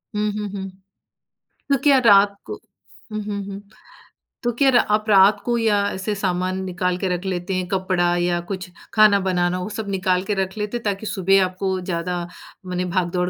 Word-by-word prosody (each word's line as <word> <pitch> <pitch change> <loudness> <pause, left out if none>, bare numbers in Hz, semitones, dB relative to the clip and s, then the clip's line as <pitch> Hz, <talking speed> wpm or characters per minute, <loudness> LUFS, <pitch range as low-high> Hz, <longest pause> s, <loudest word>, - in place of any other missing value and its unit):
हुँ, 210 0 0
हुँ, 210 -1 -3
हुँ। 195 -1 -5 1.0
तो 275 - +4
क्या 280 -2 +6
रात 200 -1 +6
को - - -6 0.6
हुँ, 215 0 -3
हुँ, 205 -1 -4
हुँ, 200 0 -7 0.8
तो 240 - +1
क्या 275 +1 +4
रा 245 - +5
आप 215 0 -3
रात 200 +1 +6
को 240 -1 +1
या 220 -3 +2
ऐसे 195 +2 -3
सामान 185 -1 -1
निकाल 180 -1 -1
के 190 - -2
रख 180 +3 -7
लेते 185 0 -3
हैं, 180 -1 -2
कपड़ा 185 -2 0
या 175 0 0
कुछ 185 -1 -5 0.2
खाना 215 -2 +6
बनाना, 180 -1 0
वो 210 - -4
सब 215 -1 -5
निकाल 185 -1 0
के 210 - -2
रख 190 +3 -8
लेते 210 +3 -2
हैं 235 - -10
ताकि 205 +1 -2
सुबह 195 -1 +3
आपको 185 +1 -2
ज़्यादा 175 0 -3 0.4
मने 180 0 -2
भाग-दौड़ 180 0 0
190 Hz, 190 wpm, -21 LUFS, 180-210 Hz, 1.0 s, क्या